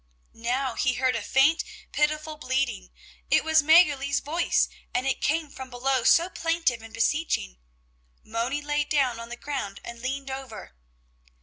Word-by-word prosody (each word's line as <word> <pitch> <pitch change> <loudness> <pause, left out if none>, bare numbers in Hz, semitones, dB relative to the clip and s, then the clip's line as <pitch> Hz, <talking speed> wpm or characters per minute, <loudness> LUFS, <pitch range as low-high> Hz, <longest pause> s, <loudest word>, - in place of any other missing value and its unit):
Now 245 +3 -1
he 255 +2 0
heard 255 -1 +1
a 230 - -2
faint, 275 +9 +3 0.3
pitiful 305 +1 0
bleating; 260 - -2 0.4
it - - +4
was 315 0 +4
Mäggerli's 290 -3 +4
voice, 330 +4 +1 0.3
and 255 - +1
it 270 - -1
came 310 -1 0
from 260 -1 -9
below 255 0 0
so 335 +7 +5
plaintive 330 -9 -1
and 225 0 -12
beseeching. 230 - -1 0.6
Moni 240 +6 -2
lay 295 0 0
down 275 -5 +1
on 230 0 -8
the 240 - -5
ground 260 -9 -5
and 235 0 -9
leaned 270 +1 -4
over. 260 - -8
270 Hz, 150 wpm, -26 LUFS, 240-300 Hz, 0.6 s, so